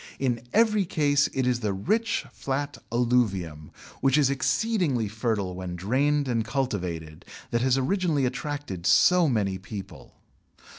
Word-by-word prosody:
In 125 -4 -1
every 215 -2 +3
case 145 -5 +2
it 130 -1 -1
is 125 -1 +1
the 105 -4 -1
rich 210 - 0
flat 140 +1 -3
alluvium, 100 -11 0 0.3
which 135 +1 +3
is 140 -2 +3
exceedingly 140 - 0
fertile 105 -3 -2
when 90 -1 -5
drained 135 - +1
and 115 -3 0
cultivated, 90 - -3 0.3
that 120 - +1
has 130 +1 +2
originally 155 0 +1
attracted 135 - -4
so 165 - +5
many 100 -6 0
people. 100 -1 -9
125 Hz, 135 wpm, -26 LUFS, 100-145 Hz, 0.3 s, so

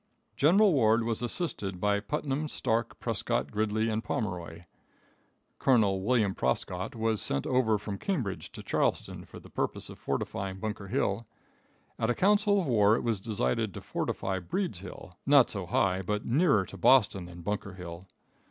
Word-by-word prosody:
General 190 +6 +5
Ward 115 -4 +4
was 115 0 -2
assisted 115 - -3
by 100 +1 +2
Putnam, 135 +8 -2
Starke, 115 -5 -1
Prescott, 70 +2 -1
Gridley 110 +1 0
and 110 0 -1
Pomeroy. 90 -5 -4 1.0
Colonel 105 -7 +3
William 110 -2 +2
Prescott 90 - -2
was 110 -1 0
sent 70 - 0
over 125 -4 +2
from 100 -1 -6
Cambridge 130 - -3
to - - -9
Charlestown - - -1
for - - -11
the - - -16
purpose - - -3
of - - -12
fortifying 95 -1 -3
Bunker 105 -1 -4
Hill. 110 -1 -1 0.7
At 115 - +1
a 120 - +2
council 205 +1 +3
of 185 - -1
war 110 -5 +4
it - - -2
was 115 -5 -1
decided 95 - -1
to - - -6
fortify 95 -1 -2
Breeds 95 - -3
Hill, 90 -1 -11
not 140 -3 +6
so 95 -4 -4
high 95 +1 +1
but 105 +3 -2
nearer 135 - +3
to 100 - -11
Boston 100 -3 +4
than 85 0 -11
Bunker 100 -1 -3
Hill. 90 0 -9
105 Hz, 160 wpm, -29 LUFS, 95-125 Hz, 1.0 s, not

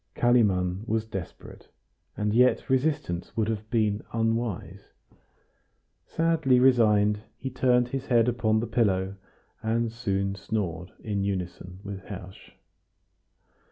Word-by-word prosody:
Kalimann 100 -6 +2
was 110 0 0
desperate, 95 -5 -8 0.5
and 105 0 0
yet 125 +3 +3
resistance 130 - -1
would 110 -1 +1
have 110 -1 -4
been 110 -2 +1
unwise. 115 -3 -2 1.1
Sadly 160 -6 +2
resigned, 105 -5 +4 0.2
he 130 +1 -5
turned 125 -1 +2
his 135 +1 -4
head 120 -2 +4
upon 110 -3 +2
the - - -2
pillow, 100 -5 +1 0.5
and 115 +1 0
soon 100 -4 -1
snored 95 -4 -3
in 100 -2 -1
unison 90 -1 -4
with 100 -1 -6
Hersch. 95 -2 -10
110 Hz, 115 wpm, -27 LUFS, 100-120 Hz, 1.1 s, resigned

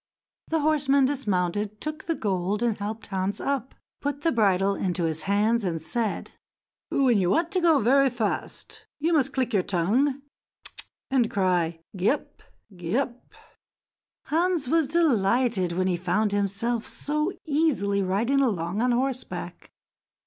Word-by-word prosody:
The 320 -1 0
horseman 285 -3 +3
dismounted, 210 -5 -1
took 310 0 -5
the 330 - +1
gold, 200 0 -1
and 235 -3 +1
helped 210 +2 -5
Hans 195 +1 -2
up, 270 -2 -2 0.3
put 285 0 -3
the 330 - +3
bridle 200 -3 +2
into 180 -3 -2
his 160 -1 -1
hands, 215 +3 +2
and 170 -4 -1
said: 225 +6 -2 0.6
"When 250 -6 +3
you 180 -2 +2
want 330 - +1
to 370 -2 +1
go 330 -3 +5
very 270 +3 +4
fast, 230 -4 -4
you 325 +3 +1
must 280 -4 +2
click 255 -3 -1
your 200 - +4
tongue 235 +11 0 0.9
and 250 -4 +3
cry 175 -4 0
'Gee 190 +2 +2
up! 295 - -3 0.3
Gee 175 +5 -2
up!'" 250 -3 -3 0.9
Hans 335 -1 +1
was 320 +1 +2
delighted 240 - +2
when 185 +2 0
he 180 -2 +1
found 190 +4 0
himself 205 +4 -1
so 300 +4 -2
easily 285 - +1
riding 225 +9 +1
along 195 -5 0
on 250 - +2
horseback. 255 +1 -3
230 Hz, 145 wpm, -26 LUFS, 195-275 Hz, 0.9 s, go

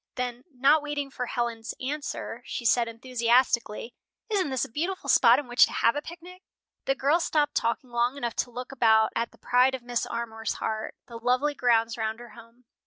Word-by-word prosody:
Then, 250 0 -4
not 280 +4 +4
waiting 290 -2 -4
for 250 -2 -4
Helen's 235 -2 -3
answer, 275 -3 -4
she 240 - -5
said, 235 0 +3
enthusiastically, 235 -1 0 0.4
"Isn't 385 -8 +1
this 260 -2 0
a - - -14
beautiful 345 +9 -3
spot 235 0 +6
in 285 -2 -4
which 245 0 +5
to - - -9
have 230 - +2
a 290 - -2
picnic?" 350 +3 -11 0.4
The 270 - +1
girls 290 +6 +2
stopped 295 -2 +1
talking 235 +2 -1
long 240 +3 0
enough 240 -4 -3
to - - 0
look 250 +2 -7
about 220 -4 +4
at 230 0 -1
the - - -22
pride 250 +2 +3
of 255 - -9
Mrs. 240 -1 -2
Armour's 225 -1 -3
heart, 220 0 -4
the 235 -1 -9
lovely 255 +5 +1
grounds 230 -3 +1
round 220 +1 -2
her 240 0 -11
home. 230 +1 -16
245 Hz, 195 wpm, -27 LUFS, 230-275 Hz, 0.4 s, spot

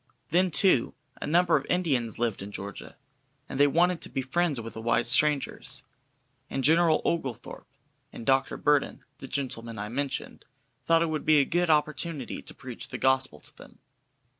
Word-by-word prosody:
Then, 180 +2 +3
too, 170 -6 +3 0.3
a - - -3
number 175 +2 +3
of 145 - +1
Indians 135 - 0
lived 115 -4 -1
in 100 +1 -7
Georgia, 100 0 -8 0.5
and 135 - -6
they 145 - +6
wanted 170 +4 +2
to - - -4
be 135 - -3
friends 155 0 0
with 115 -1 -7
the 110 - -7
white 120 +1 +1
strangers, 140 +3 +1 0.7
and 135 - -3
General 160 +2 +4
Oglethorpe 135 -8 -3 0.4
and 115 - -9
Dr. 135 0 +2
Burton, 145 -1 +1
the 135 - -8
gentlemen 115 -5 -4
I 105 +1 -5
mentioned, 140 +3 -4 0.4
thought 165 0 +4
it 165 - -1
would 155 -1 -2
be 155 -1 +5
a 140 - +4
good 175 +2 0
opportunity 150 -2 -1
to - - -10
preach 125 -3 -9
the - - -6
gospel 130 - +1
to - - -13
them. - - -15
140 Hz, 175 wpm, -27 LUFS, 120-165 Hz, 0.7 s, they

